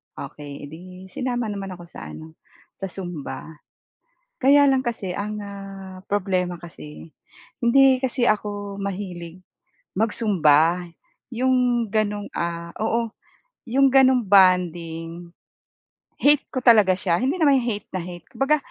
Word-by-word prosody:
Okey, 145 Hz, -1 st, -8 dB
e -, -, -5 dB
'di 160 Hz, +2 st, -10 dB, 0.3 s
sinama 245 Hz, -1 st, -2 dB
naman 195 Hz, -2 st, -5 dB
ako 175 Hz, -, -12 dB
sa -, -, -9 dB
ano, 160 Hz, 0 st, -11 dB, 0.4 s
sa 195 Hz, -, -3 dB
zumba. 175 Hz, -6 st, -7 dB, 0.9 s
Kaya 285 Hz, +2 st, +6 dB
lang 265 Hz, -1 st, +3 dB
kasi 220 Hz, -6 st, -3 dB
ang, 210 Hz, +3 st, -4 dB
ah, 195 Hz, -2 st, -9 dB
problema 185 Hz, -3 st, 0 dB
kasi, 80 Hz, -, -11 dB, 0.5 s
hindi 265 Hz, +2 st, +5 dB
kasi 255 Hz, -1 st, -1 dB
ako 205 Hz, -1 st, -2 dB
mahilig 185 Hz, -3 st, -5 dB, 0.6 s
mag-zumba. 180 Hz, -6 st, +3 dB, 0.5 s
Yung 250 Hz, -1 st, +2 dB
gano'ng, 210 Hz, -1 st, -1 dB
ah, 170 Hz, 0 st, -3 dB
oo, 230 Hz, +1 st, 0 dB, 0.6 s
yung 270 Hz, +3 st, +5 dB
gano'ng 260 Hz, -2 st, +5 dB
bonding, 175 Hz, -3 st, +2 dB, 0.9 s
hate 290 Hz, 0 st, +4 dB
ko 255 Hz, -, 0 dB
talaga 215 Hz, -6 st, +6 dB
siya. 175 Hz, -3 st, +1 dB
Hindi 270 Hz, +8 st, 0 dB
naman 285 Hz, -3 st, +5 dB
yung 240 Hz, -, -4 dB
hate 205 Hz, -1 st, -6 dB
na 185 Hz, -, -2 dB
hate. 175 Hz, -1 st, -9 dB
Kumbaga, 285 Hz, +3 st, +2 dB
200 Hz, 130 wpm, -23 LUFS, 175-240 Hz, 0.9 s, Kaya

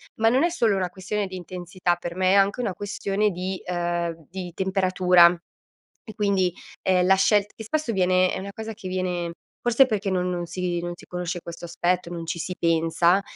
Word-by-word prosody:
Ma 225 Hz, 0 st, +3 dB
non 260 Hz, +6 st, +3 dB
è 345 Hz, -, +3 dB
solo 230 Hz, -, +2 dB
una 185 Hz, -2 st, -1 dB
questione 195 Hz, +2 st, -3 dB
di 185 Hz, -, -8 dB
intensità, 180 Hz, 0 st, -2 dB
per 175 Hz, 0 st, -6 dB
me 185 Hz, 0 st, +2 dB
è -, -, +5 dB
anche 200 Hz, +5 st, +3 dB
una 200 Hz, -6 st, -1 dB
questione 205 Hz, +1 st, -1 dB
di, 185 Hz, +1 st, -4 dB
ehm, 170 Hz, -2 st, -2 dB
di 185 Hz, -1 st, -6 dB
temperatura. 185 Hz, -2 st, +4 dB, 0.7 s
E 220 Hz, -, -10 dB
quindi, 195 Hz, -4 st, +1 dB, 0.3 s
ehm, 180 Hz, -1 st, +3 dB
la 190 Hz, -, +6 dB
scelt 205 Hz, +1 st, +2 dB
che 220 Hz, -, -8 dB
spesso 300 Hz, +1 st, -1 dB
viene 185 Hz, -2 st, +3 dB
è -, -, -3 dB
una 200 Hz, +1 st, -7 dB
cosa 220 Hz, 0 st, -6 dB
che 195 Hz, -3 st, -9 dB
viene 180 Hz, -2 st, -2 dB, 0.3 s
forse 240 Hz, +3 st, +4 dB
perché 210 Hz, -5 st, -1 dB
non 180 Hz, -1 st, 0 dB
non 175 Hz, -1 st, -2 dB
si 175 Hz, 0 st, -2 dB
non 175 Hz, 0 st, -4 dB
si 175 Hz, -, -15 dB
conosce 180 Hz, 0 st, -4 dB
questo 170 Hz, 0 st, -8 dB
aspetto, 175 Hz, +1 st, -1 dB
non 170 Hz, -1 st, -5 dB
ci 170 Hz, +1 st, -3 dB
si 180 Hz, +2 st, -4 dB
pensa, 170 Hz, +3 st, +3 dB
185 Hz, 200 wpm, -25 LUFS, 175-200 Hz, 0.7 s, la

